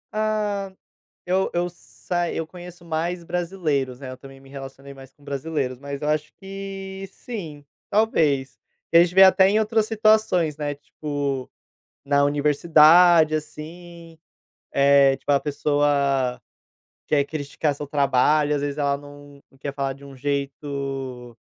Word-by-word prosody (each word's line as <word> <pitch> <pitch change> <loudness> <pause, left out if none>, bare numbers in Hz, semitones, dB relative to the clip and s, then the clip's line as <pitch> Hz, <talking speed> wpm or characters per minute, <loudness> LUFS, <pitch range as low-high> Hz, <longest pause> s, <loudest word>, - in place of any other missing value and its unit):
Ah, 210 -2 -1 0.5
eu 185 +1 0
eu 175 +1 0
sai 175 0 -4
eu 160 -1 -3
conheço 175 0 -12
mais 170 +2 -3
brasileiros, 165 -8 -2
né, 130 -2 -8
eu 130 - -8
também 135 +1 -13
me 135 0 -18
relacionei 135 0 -10
mais 135 -1 -14
com 145 - -25
brasileiros, 140 -2 -3
mas 140 0 -6
eu 150 - -1
acho 155 0 -1
que, 195 0 -7
sim. 165 -12 -8 0.3
Talvez. 155 -11 +1 0.3
E 165 - +6
a 170 - +8
gente 180 - -3
vê 190 - +6
até 190 0 +6
em 210 +2 +3
outras 220 0 +1
situações, 215 -8 +2
né, 145 -1 -2
tipo, 145 -2 -4 0.6
na 140 0 +2
universidade, 155 +3 +5
assim, 165 +2 -9 0.6
eh, 140 -1 +5
tipo - - -5
a 140 - +5
pessoa 140 -3 0 0.7
quer 145 -2 +2
criticar 145 0 -3
seu 145 +1 -7
trabalho 145 +1 +2
às 145 - -1
vezes 145 0 -3
ela 140 -1 0
não 145 0 -14 0.2
quer 140 0 -5
falar 135 -1 -2
de 140 +1 -15
um 140 - -11
jeito 135 -2 -4
150 Hz, 145 wpm, -23 LUFS, 140-175 Hz, 0.7 s, a